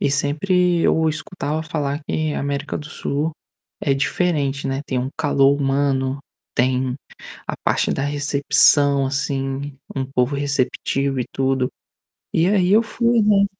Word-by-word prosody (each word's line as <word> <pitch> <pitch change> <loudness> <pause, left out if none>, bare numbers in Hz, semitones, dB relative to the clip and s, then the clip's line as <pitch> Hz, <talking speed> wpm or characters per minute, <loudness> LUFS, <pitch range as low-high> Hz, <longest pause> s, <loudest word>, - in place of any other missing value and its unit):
e - - +2
sempre 175 +5 +2
eu 160 -1 +3
escutava 155 -1 -3
falar 150 -2 -3
que 155 -1 -1
a - - -2
América 140 +1 -3
do 150 - -8
Sul 150 +2 -2 0.5
é 140 - +1
diferente, 140 -1 0
né, 135 +1 -1
tem 130 - -2
um 125 - -1
calor 140 -2 +3
humano, 135 -1 +1 0.4
tem 130 +1 +1 0.5
a - - -3
parte - - +1
da 135 - -2
recepção 145 -1 +3
assim, 135 0 -2 0.2
um 135 - 0
povo 130 +1 0
receptivo 140 -1 -1
e - - -2
tudo. 135 -1 +1 0.7
E 165 - +3
aí 190 -3 +2
eu 220 +2 +6
fui, 235 +1 +1
né, 205 -1 +4
140 Hz, 145 wpm, -21 LUFS, 135-155 Hz, 0.7 s, eu